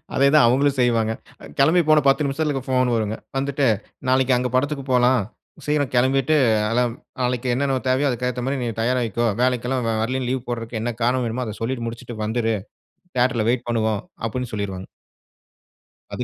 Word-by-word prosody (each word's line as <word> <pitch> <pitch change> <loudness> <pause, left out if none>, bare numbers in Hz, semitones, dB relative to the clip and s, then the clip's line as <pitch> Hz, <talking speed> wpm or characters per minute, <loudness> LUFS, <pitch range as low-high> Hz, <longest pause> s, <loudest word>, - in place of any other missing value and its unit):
அதே 140 +1 +4
தான் 150 - +7
அவங்களும் 135 +3 +2
செய்வாங்க. 115 -3 +2 0.5
கெளம்பி 160 +6 +5
போன 155 -1 +6
10 135 +2 +3
நிமிசத்தில 140 -1 -1
போன் 130 -2 +2
வருங்க. 110 -1 -1 0.2
வந்துட்டு 140 0 0 0.4
"நாளைக்கு 130 0 +3
அங்க 125 0 -1
படத்துக்கு 140 +1 0
போலாம். 125 -1 +4 0.4
சீக்கிரம் 145 -3 0
கெளம்பிட்டு 135 +4 +3 0.3
அலம் 120 0 +1 0.3
நாளைக்கு 125 0 -1
என்னென்ன 135 0 0
தேவையோ, 130 +3 +2
அதுக்கு 125 0 -2
ஏத்த 125 0 -4
மாரி 135 0 -1
நீ 120 - -2
தயாராயிக்கோ, 120 -2 0 0.3
எல்லாம் 125 +1 -2
வ 115 - +1
வரலைன்னு, 130 +2 -1
லீவ் 130 -1 -2
போடுறதுக்கு 115 -1 -4
என்ன 120 +1 -2
காரணம் 125 +1 +1
வேணுமோ 120 +2 -2
அத 110 -1 -5
சொல்லிட்டு 120 0 -2
முடிச்சுட்டு 115 0 -7
வந்துரு. 115 0 0 0.6
தியேட்டர்ல 125 -3 +2
வெயிட் 125 0 -1
பண்ணுவோம்" 110 -3 0 0.2
அப்டின்னு 125 +2 -3
சொல்லிருவாங்க. 95 -3 -4 1.3
அது - - -2
125 Hz, 165 wpm, -22 LUFS, 115-135 Hz, 1.3 s, தான்